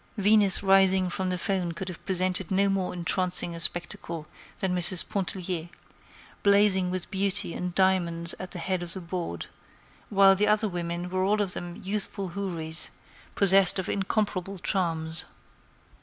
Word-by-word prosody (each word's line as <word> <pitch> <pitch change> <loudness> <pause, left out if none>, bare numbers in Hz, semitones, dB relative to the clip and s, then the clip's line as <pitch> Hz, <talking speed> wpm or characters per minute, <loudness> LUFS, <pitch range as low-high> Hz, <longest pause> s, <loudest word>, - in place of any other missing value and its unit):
Venus 205 -1 +5
rising 190 -1 +4
from 185 +1 -3
the 180 - -2
foam 185 -3 -2
could 180 +3 -7
have 180 -3 -8
presented 185 -1 -1
no 195 +1 +2
more 195 -2 -1
entrancing 180 0 -1
a 165 - -7
spectacle 170 -2 -1 0.3
than 185 -1 -2
Mrs. 180 0 +2
Pontellier, 180 -3 -3 0.7
blazing 200 -2 +3
with 185 -1 -5
beauty 195 -2 -1
and 180 -1 -5
diamonds 170 -3 +4
at 185 - -7
the 180 - -8
head 185 +1 -3
of 175 -1 -7
the 190 - -7
board, 170 - -5 0.6
while 195 -1 +5
the 210 +2 0
other 215 +1 +2
women 175 -1 -4
were 185 0 -1
all 210 +2 +1
of 195 -3 -1
them 175 0 -7
youthful 200 -1 -2
houris, 170 -4 -4 0.5
possessed 195 -1 +5
of 190 - -3
incomparable 195 -1 -2
charms. 165 -3 0
185 Hz, 155 wpm, -26 LUFS, 175-195 Hz, 0.7 s, Venus